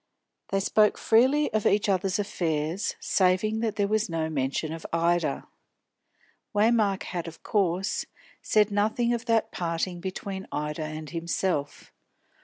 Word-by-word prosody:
They 195 - +1
spoke 210 +1 +3
freely 260 +7 +3
of 215 -1 +2
each 205 +1 +2
other's 190 0 +1
affairs, 165 -3 -1
saving 190 +4 +2
that 220 -2 -1
there 200 -1 +1
was 215 0 0
no 160 -1 -2
mention 140 +2 -1
of 165 - -7
Ida. 170 +1 +1 1.1
Waymark 210 -2 +3
had 175 -2 -4
of 165 - -10
course 190 -2 0 0.3
said 210 -1 +3
nothing 220 +4 +1
of 235 -1 -3
that 230 -2 +1
parting 175 +1 -2
between 190 +1 -5
Ida 150 +1 -3
and 155 -1 -7
himself. 165 -3 -2
190 Hz, 135 wpm, -27 LUFS, 165-215 Hz, 1.1 s, spoke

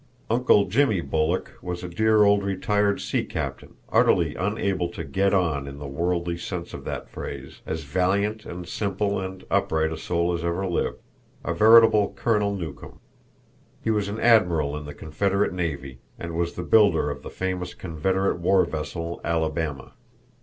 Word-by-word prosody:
"Uncle 115 -4 +4
Jimmy" 110 -1 +2
Bulloch 80 +2 -1
was 90 -1 -5
a - - -4
dear 110 +4 +3
old 100 0 +4
retired 100 +1 +1
sea - - -1
captain, - - -5 0.2
utterly - - +3
unable 95 -2 -1
to 85 - -6
"get 95 +7 +1
on" 80 -8 +1
in 70 0 -8
the 70 - -8
worldly 85 +4 -1
sense 85 -1 -5
of - - -8
that - - -5
phrase, 70 -1 -8
as 80 0 -3
valiant 100 +8 0
and 85 0 -7
simple 100 +1 -1
and 95 0 -6
upright 80 0 +1
a - - -5
soul 85 0 0
as 85 0 -3
ever 85 +3 -1
lived, 90 -2 -1 0.5
a 85 - 0
veritable 110 +1 +6
Colonel 105 -3 +1
Newcome. 85 -5 -7 0.8
He 110 - +1
was 105 -2 0
an 105 +2 -4
Admiral 90 -11 +3
in 75 0 -6
the 75 - -8
Confederate 100 +6 0
navy, 70 -7 -4 0.2
and 85 0 -6
was 85 0 -1
the 90 - -4
builder 100 -7 +4
of - - -7
the - - -8
famous 95 -1 -4
Confederate 95 +2 -1
war 95 +2 +3
vessel 85 +2 -5
Alabama. 80 -4 -2
90 Hz, 165 wpm, -25 LUFS, 80-100 Hz, 0.8 s, veritable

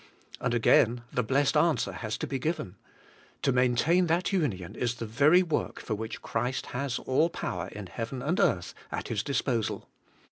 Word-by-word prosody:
And 120 - 0
again 120 +1 +4
the 125 - +2
blessed 135 +4 +1
answer 165 -2 +2
has 110 -2 -4
to - - -3
be 135 - -3
given: 155 - -3 0.7
To - - +3
maintain 130 +8 +3
that 175 +4 +1
union 110 - -1
is 125 -1 -1
the 115 - -5
very 145 +11 +5
work 160 -4 -2
for 110 - -4
which 110 +1 -5
Christ 125 +3 -2
has 125 0 -1
all 145 +6 +2
power 90 - -4
in 105 -1 -8
heaven 115 +8 -5
and 170 +6 0
earth 90 -1 +1 0.2
at - - -4
His 110 -4 0
disposal. 125 -5 -1
125 Hz, 175 wpm, -29 LUFS, 115-150 Hz, 0.7 s, very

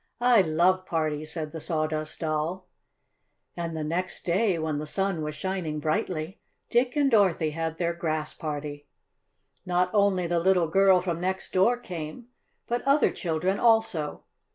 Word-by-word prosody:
"I 240 -3 +5
love 185 +3 +2
parties!" 155 -2 -1
said 155 -3 -4
the 160 0 -7
Sawdust 155 -1 -2
Doll. 160 +4 -2 0.9
And 170 -2 -4
the 155 - -2
next 175 +4 -3
day, 185 +1 +2
when 155 -2 -2
the 150 - -5
sun 195 0 -1
was 150 0 -4
shining 175 -4 -3
brightly, 155 +4 -2 0.3
Dick 245 +2 +2
and 285 -2 +3
Dorothy 185 -7 +3
had 160 +1 -3
their 170 0 0
Grass 155 -2 -2
Party. 145 -1 -5 0.8
Not 180 0 +1
only 200 -3 +3
the 170 0 +1
little 180 -1 +3
girl 190 +1 +5
from 175 -2 -3
next 190 +1 -3
door 210 +7 +4
came, 180 +2 -7 0.4
but 240 +1 -1
other 280 +2 +3
children 180 +3 -1
also. 225 -10 +2
170 Hz, 155 wpm, -27 LUFS, 155-190 Hz, 0.9 s, I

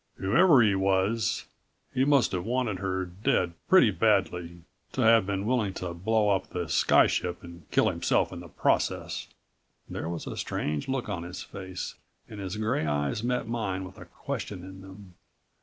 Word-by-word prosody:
"Whoever 135 - +5
he 105 -2 +3
was, 95 +3 +1 0.5
he 130 0 +2
must 140 -5 +4
have 90 -3 -2
wanted 120 -3 -1
her 95 -1 -2
dead 90 -1 0 0.2
pretty 185 - +6
badly... 90 -5 0 0.3
to - - -1
have 110 -3 +5
been 100 0 -2
willing 110 -5 0
to 90 -2 -4
blow 105 +4 +1
up 95 -1 0
the 90 -2 -3
sky 75 - +5
ship 90 -1 -2
and 85 -2 -12
kill - - +3
himself - - +1
in 90 - -6
the 85 - -10
process." 75 - -1 0.6
There 80 - -5
was 85 -2 -4
a - - -6
strange 75 -1 -2
look 130 -2 -2
on 95 -5 -3
his 85 +1 -7
face 95 -2 -6 0.3
and 105 - -9
his 95 +1 -4
gray 110 -7 0
eyes 75 +7 -1
met 125 -1 -1
mine 105 -5 -2
with 95 0 -10
a - - -10
question 95 -3 -6
in 95 0 -10
them. 95 -1 -13
95 Hz, 175 wpm, -28 LUFS, 90-110 Hz, 0.6 s, pretty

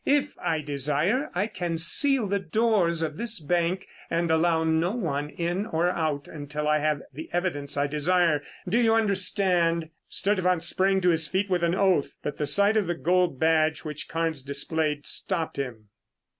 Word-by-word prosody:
If 290 0 +1
I 165 -3 -1
desire, 150 - 0
I 190 +3 +1
can 175 -6 -3
seal 265 - +3
the 200 0 0
doors 185 -3 +1
of 155 -2 -3
this 230 -1 -3
bank 175 +4 -1 0.2
and 170 0 0
allow 160 0 +2
no 160 +4 +1
one 150 - -2
in 175 +6 -2
or 175 -1 +1
out 155 -5 -2
until 150 0 -5
I 150 0 +3
have 150 -1 0
the 155 +5 -8
evidence 170 -6 -2
I 140 - +2
desire. 155 +1 +2 0.3
Do 215 +7 +2
you 225 -2 +4
understand?" 185 -6 +2 0.2
Sturtevant 185 -4 0
sprang 190 +3 +1
to 180 - +3
his 160 -2 +3
feet 195 +1 -1
with 175 -1 +1
an 170 +1 +2
oath, 190 -7 +1
but 145 - -4
the 150 - -1
sight 200 +8 +3
of 205 -5 +1
the 175 - -1
gold 180 -5 +1
badge 160 -1 +2
which 150 -2 -6
Carnes 165 -3 -2
displayed 145 +2 -2
stopped 170 -4 -2
him. 115 -6 -5
170 Hz, 175 wpm, -26 LUFS, 150-190 Hz, 0.3 s, you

